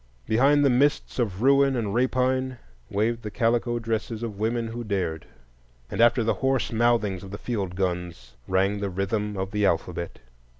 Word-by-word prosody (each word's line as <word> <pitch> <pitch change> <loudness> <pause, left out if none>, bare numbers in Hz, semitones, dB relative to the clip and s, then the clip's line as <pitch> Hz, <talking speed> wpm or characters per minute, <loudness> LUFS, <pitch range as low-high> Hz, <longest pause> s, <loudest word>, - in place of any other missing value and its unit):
Behind 140 +6 +4
the - - +5
mists 140 +2 +1
of 105 -3 -1
ruin 140 0 +4
and 110 -5 -2
rapine 130 +1 +1 0.3
waved 115 +3 0
the 105 - -5
calico 120 +2 +1
dresses 115 0 -3
of 105 -4 -5
women 115 +1 -1
who 120 +1 -5
dared, 95 -7 -2 0.6
and - - 0
after 120 0 +5
the 115 - +2
hoarse 135 -2 +1
mouthings 115 -5 +1
of 95 - -9
the 100 - -6
field 100 -6 -3
guns 90 -5 -3
rang 95 +2 +1
the 100 -1 -2
rhythm 100 +2 -2
of 95 0 -3
the 105 -1 -1
alphabet. 85 -2 -1
110 Hz, 170 wpm, -25 LUFS, 100-120 Hz, 0.6 s, the